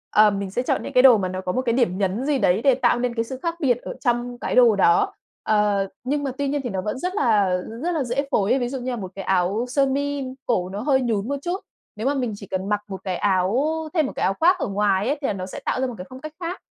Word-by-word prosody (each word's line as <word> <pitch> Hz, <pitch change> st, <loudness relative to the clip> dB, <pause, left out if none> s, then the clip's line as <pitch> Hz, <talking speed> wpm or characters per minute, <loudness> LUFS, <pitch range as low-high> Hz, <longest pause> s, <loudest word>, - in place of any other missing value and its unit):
ờm, 210 Hz, -2 st, +5 dB
mình 195 Hz, -1 st, -4 dB
sẽ 240 Hz, -, -1 dB
chọn 255 Hz, -, -1 dB
những 280 Hz, -, -6 dB
cái 250 Hz, -, +5 dB
đồ 255 Hz, -4 st, +8 dB
mà 190 Hz, -2 st, -1 dB
nó 185 Hz, 0 st, -4 dB
có 180 Hz, -, -2 dB
một 255 Hz, -, 0 dB
cái 240 Hz, -3 st, 0 dB
điểm 230 Hz, -7 st, +1 dB
nhấn 200 Hz, +6 st, -1 dB
gì 290 Hz, -2 st, +1 dB
đấy 195 Hz, -1 st, +2 dB
để 270 Hz, 0 st, +4 dB
tạo -, -, +2 dB
nên 245 Hz, -1 st, -1 dB
cái 230 Hz, -, 0 dB
sự 255 Hz, +2 st, -7 dB
khác 335 Hz, 0 st, -1 dB
biệt 255 Hz, -7 st, +2 dB
ở -, -, -6 dB
trong 240 Hz, 0 st, -1 dB
cái -, -, -2 dB
đồ 240 Hz, -4 st, +6 dB
đó. 410 Hz, -, +3 dB, 0.3 s
Ờ, 210 Hz, -2 st, +2 dB, 0.2 s
nhưng 285 Hz, +3 st, -1 dB
mà 270 Hz, -, -1 dB
tuy 285 Hz, -, -1 dB
nhiên 285 Hz, +1 st, -1 dB
thì 245 Hz, -, -3 dB
nó 190 Hz, -3 st, -2 dB
vẫn 210 Hz, +6 st, -3 dB
rất 365 Hz, +4 st, -3 dB
là 210 Hz, -, +3 dB, 0.3 s
rất 350 Hz, -, 0 dB
là 320 Hz, -5 st, 0 dB
dễ 255 Hz, +3 st, -1 dB
phối 200 Hz, -1 st, +2 dB
ấy. 270 Hz, -, +3 dB
Ví 245 Hz, -1 st, -1 dB
dụ 265 Hz, 0 st, -4 dB
như 255 Hz, +1 st, -3 dB
là -, -, -2 dB
một 190 Hz, -4 st, -6 dB
cái 195 Hz, -, -5 dB
áo 190 Hz, +5 st, +1 dB
sơ 275 Hz, +2 st, +2 dB
mi 285 Hz, +1 st, -1 dB, 0.2 s
cổ 185 Hz, -7 st, 0 dB
nó 200 Hz, +2 st, -5 dB
hơi 265 Hz, 0 st, +2 dB
nhún 225 Hz, -4 st, -1 dB
một 280 Hz, -, -1 dB
chút, 350 Hz, +4 st, -2 dB, 0.4 s
nếu 220 Hz, +4 st, -2 dB
mà 280 Hz, -, +2 dB
mình 250 Hz, -5 st, -2 dB
chỉ 200 Hz, -1 st, -11 dB
cần 190 Hz, +2 st, -3 dB
mặc 210 Hz, -1 st, +1 dB
một 190 Hz, -1 st, -7 dB
cái 185 Hz, -2 st, -2 dB
áo 200 Hz, +7 st, +1 dB, 0.3 s
thêm 315 Hz, -4 st, +2 dB
một -, -, -4 dB
cái -, -, -2 dB
áo 195 Hz, -, +2 dB
khoác 360 Hz, +3 st, +4 dB
ở -, -, -1 dB
ngoài 200 Hz, 0 st, +1 dB
ấy 285 Hz, +3 st, 0 dB
thì 275 Hz, -, 0 dB
là -, -, 0 dB
nó 185 Hz, -2 st, -5 dB
sẽ 185 Hz, -, -7 dB
tạo 255 Hz, -, 0 dB
ra 265 Hz, -, +1 dB
một 245 Hz, -, -5 dB
cái 180 Hz, -, -7 dB
phong 255 Hz, 0 st, -10 dB
cách 310 Hz, +1 st, -7 dB
khác, 355 Hz, +1 st, -5 dB
240 Hz, 310 wpm, -23 LUFS, 200-275 Hz, 0.4 s, đồ